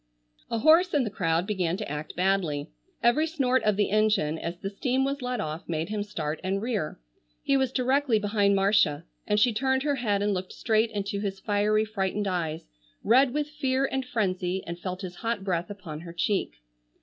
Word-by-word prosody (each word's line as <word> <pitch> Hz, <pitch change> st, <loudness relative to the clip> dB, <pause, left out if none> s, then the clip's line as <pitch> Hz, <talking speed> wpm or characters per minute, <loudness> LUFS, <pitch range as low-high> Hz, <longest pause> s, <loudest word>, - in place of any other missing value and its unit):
A 230 Hz, -, -1 dB
horse 320 Hz, +7 st, +5 dB
in 285 Hz, -, +3 dB
the 215 Hz, -, -3 dB
crowd 165 Hz, -3 st, 0 dB
began 185 Hz, -4 st, -1 dB
to 215 Hz, -, -5 dB
act 150 Hz, +1 st, -5 dB
badly. 180 Hz, -6 st, 0 dB, 0.3 s
Every 295 Hz, +7 st, +4 dB
snort 260 Hz, -5 st, +1 dB
of 210 Hz, -2 st, +1 dB
the 205 Hz, -2 st, +1 dB
engine 210 Hz, -8 st, +2 dB
as 170 Hz, +1 st, -4 dB
the 195 Hz, +2 st, -5 dB
steam 255 Hz, +5 st, 0 dB
was 275 Hz, +1 st, -2 dB
let 250 Hz, -1 st, -2 dB
off 155 Hz, 0 st, -5 dB
made 160 Hz, +1 st, -2 dB
him 210 Hz, -1 st, -2 dB
start 160 Hz, -7 st, -4 dB
and 190 Hz, +1 st, 0 dB
rear. 210 Hz, -, -2 dB, 0.4 s
He 275 Hz, -, +2 dB
was 265 Hz, -2 st, +2 dB
directly 260 Hz, -1 st, +2 dB
behind 205 Hz, -1 st, +2 dB
Marcia, 195 Hz, -6 st, +3 dB, 0.2 s
and 210 Hz, 0 st, +2 dB
she 240 Hz, +1 st, +4 dB
turned 265 Hz, +4 st, +1 dB
her 290 Hz, -2 st, 0 dB
head 205 Hz, -5 st, 0 dB
and 205 Hz, 0 st, +1 dB
looked 185 Hz, 0 st, -4 dB
straight 220 Hz, 0 st, +1 dB
into 200 Hz, -2 st, -3 dB
his 195 Hz, -1 st, -3 dB
fiery 210 Hz, +1 st, +1 dB
frightened 205 Hz, -1 st, -2 dB
eyes, 165 Hz, -4 st, -2 dB, 0.4 s
red 250 Hz, +4 st, +5 dB
with 295 Hz, +2 st, -1 dB
fear 275 Hz, -3 st, 0 dB
and 265 Hz, -1 st, -2 dB
frenzy, 190 Hz, -6 st, -1 dB
and 170 Hz, +1 st, -6 dB
felt 185 Hz, +1 st, -5 dB
his 180 Hz, -1 st, -7 dB
hot 225 Hz, -3 st, -2 dB
breath 175 Hz, -3 st, -1 dB
upon 175 Hz, -7 st, -7 dB
her 170 Hz, +1 st, -9 dB
cheek. 190 Hz, -, 0 dB
205 Hz, 195 wpm, -27 LUFS, 180-250 Hz, 0.4 s, horse